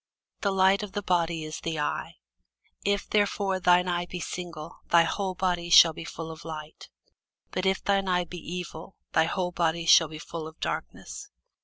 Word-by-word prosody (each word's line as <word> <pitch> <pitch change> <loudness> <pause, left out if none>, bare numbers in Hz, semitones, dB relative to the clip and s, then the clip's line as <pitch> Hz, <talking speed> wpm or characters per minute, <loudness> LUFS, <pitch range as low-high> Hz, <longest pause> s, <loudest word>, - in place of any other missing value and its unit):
The 200 - 0
light 195 +1 +3
of 210 -2 -7
the 205 - -3
body 170 -3 0
is 155 0 -6
the 160 -2 -3
eye: 150 - -3 0.7
if 200 0 0
therefore 200 -2 +1
thine 180 0 +4
eye 175 0 -1
be 180 - -6
single, 170 -2 -7
thy 170 -1 +6
whole 190 +2 -2
body 175 -2 -1
shall 165 -1 +8
be 165 - -8
full 165 -1 -7
of 160 0 -11
light. 155 -1 -8 0.6
But 185 +1 -1
if 190 0 0
thine 195 -1 +1
eye 180 -1 +2
be 175 +1 -8
evil, 175 +1 -7 0.2
thy 160 - +4
whole 180 +2 -2
body 170 -1 0
shall 165 0 +7
be 155 0 -9
full 160 0 -7
of 160 - -13
darkness. 410 - -5
175 Hz, 185 wpm, -27 LUFS, 165-190 Hz, 0.7 s, shall